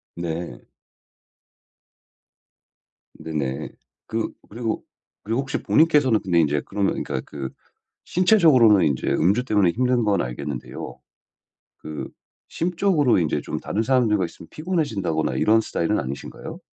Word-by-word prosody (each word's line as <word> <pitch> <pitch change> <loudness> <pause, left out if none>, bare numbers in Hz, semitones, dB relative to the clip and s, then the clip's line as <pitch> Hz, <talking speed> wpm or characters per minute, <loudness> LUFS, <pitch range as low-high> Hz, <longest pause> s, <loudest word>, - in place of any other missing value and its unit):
네. 85 -6 -5 2.5
네네. 70 -4 -4 0.4
그 110 0 -2 0.2
그리고 115 0 -3 0.4
그리고 115 +5 -1
혹시 135 0 -4
본인께서는 150 -8 +4
근데 90 -3 +2
인제 75 -2 +2
그러면 100 -1 -1
그러니까 65 - -3
그 70 -3 -6 0.6
신체적으로는 160 - +5
인제 70 -3 -1
음주 100 +10 +2
때문에 105 -7 +3
힘든 125 +2 +1
건 105 -2 +2
알겠는데요. 60 +2 -6 0.8
그 75 -1 -7 0.4
심적으로 170 - +2
인제 80 - 0
좀 - - -4
다른 110 - -2
사람들과 110 -6 +2
있으면 85 - -11
피곤해진다거나 115 - -1
이런 110 +1 +4
스타일은 105 -1 -1
아니신가요? 70 +2 -7
105 Hz, 305 characters per minute, -23 LUFS, 80-130 Hz, 2.5 s, 신체적으로는